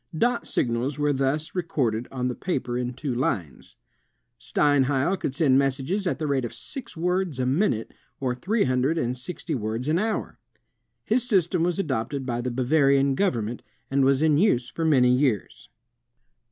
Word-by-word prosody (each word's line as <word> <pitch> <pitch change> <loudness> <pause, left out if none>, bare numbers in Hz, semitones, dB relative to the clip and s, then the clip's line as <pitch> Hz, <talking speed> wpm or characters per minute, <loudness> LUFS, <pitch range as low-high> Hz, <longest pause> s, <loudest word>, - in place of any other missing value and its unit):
Dot 240 +5 +1
signals 120 +4 -1
were 145 0 +1
thus 140 +3 -1
re 180 - 0
corded 125 -9 -1
on 125 -1 -2
the 125 - -1
paper 130 -7 -3
in 125 0 -2
two 130 0 -3
lines. 90 - -3 0.6
Steinheil 145 +5 +2
could 135 -7 -4
send 140 -4 +4
messages 140 +9 0
at - - 0
the 155 - -3
rate 140 -3 0
of 120 -1 -5
six 225 - -8
words 180 -3 0
a 130 - +1
minute, 130 - 0 0.3
or 130 -2 -1
three 200 - 0
hundred 130 +5 +1
and 125 -5 -1
sixty 160 +5 -5
words 115 +1 -3
an 160 +3 +2
hour. 220 +1 -2 0.7
His 245 +2 +1
system 180 -4 +2
was 175 +1 +1
adopted 135 - -2
by 120 -2 -2
the 125 - -2
Bavarian 135 +2 +3
government, 120 - -1 0.3
and 135 0 +3
was 135 +2 +3
in 155 -2 +4
use 125 - +2
for 165 - -2
many 130 -6 +4
years. 125 -7 -1
135 Hz, 170 wpm, -25 LUFS, 125-165 Hz, 0.7 s, send